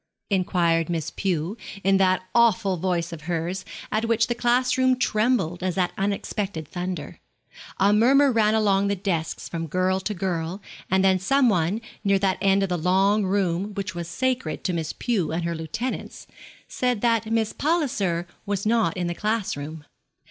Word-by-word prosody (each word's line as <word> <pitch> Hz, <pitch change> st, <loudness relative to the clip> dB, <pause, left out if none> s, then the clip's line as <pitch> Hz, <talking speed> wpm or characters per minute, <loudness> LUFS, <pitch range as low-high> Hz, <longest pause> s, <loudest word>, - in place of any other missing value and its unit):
inquired 175 Hz, -3 st, +1 dB
Miss 165 Hz, -2 st, -2 dB
Pew, 180 Hz, 0 st, -2 dB, 0.3 s
in 195 Hz, 0 st, +4 dB
that 185 Hz, -1 st, +2 dB
awful 225 Hz, -5 st, +3 dB
voice 170 Hz, -1 st, -1 dB
of 160 Hz, -, -8 dB
hers, 175 Hz, +3 st, -2 dB, 0.3 s
at 215 Hz, +1 st, 0 dB
which 230 Hz, 0 st, +2 dB
the 240 Hz, -, -1 dB
class 245 Hz, +1 st, +2 dB
room 260 Hz, 0 st, +3 dB
trembled, 215 Hz, -7 st, +1 dB
as 185 Hz, 0 st, -2 dB
at 180 Hz, -1 st, +1 dB
unexpected 195 Hz, -4 st, -2 dB
thunder. 175 Hz, -4 st, -5 dB, 0.6 s
A 200 Hz, +2 st, +4 dB
murmur 270 Hz, +6 st, +5 dB
ran 220 Hz, -2 st, +3 dB
along 200 Hz, -2 st, +2 dB
the 200 Hz, -, +1 dB
desks, 180 Hz, -5 st, -3 dB
from 165 Hz, -1 st, -4 dB
girl 185 Hz, +3 st, +1 dB
to 210 Hz, +2 st, -3 dB
girl, 175 Hz, -1 st, -2 dB, 0.3 s
and 190 Hz, +1 st, +3 dB
then 190 Hz, -1 st, +4 dB
some 255 Hz, +7 st, +3 dB
one, 185 Hz, +2 st, +1 dB, 0.2 s
near 200 Hz, -1 st, +3 dB
that 190 Hz, -1 st, 0 dB
end 195 Hz, 0 st, +3 dB
of 195 Hz, -, -1 dB
the 180 Hz, -1 st, -1 dB
long 195 Hz, +4 st, +3 dB
room 195 Hz, +1 st, 0 dB
which 195 Hz, -4 st, -3 dB
was 170 Hz, -1 st, -5 dB
sacred 250 Hz, -4 st, -2 dB
to 185 Hz, -, -1 dB
Miss 160 Hz, -2 st, -2 dB
Pew 215 Hz, -11 st, -1 dB
and 170 Hz, +2 st, -2 dB
her 170 Hz, 0 st, -1 dB
lieutenants, 215 Hz, +11 st, -5 dB, 0.4 s
said 250 Hz, -4 st, -1 dB
that 230 Hz, -2 st, +1 dB
Miss 225 Hz, -1 st, +1 dB
Palliser 235 Hz, -, 0 dB, 0.2 s
was 200 Hz, -1 st, -2 dB
not 220 Hz, -6 st, +2 dB
in 180 Hz, -, -1 dB
the 175 Hz, -, -1 dB
class 215 Hz, +2 st, -1 dB
room. 145 Hz, +1 st, -7 dB
195 Hz, 175 wpm, -24 LUFS, 175-220 Hz, 0.6 s, murmur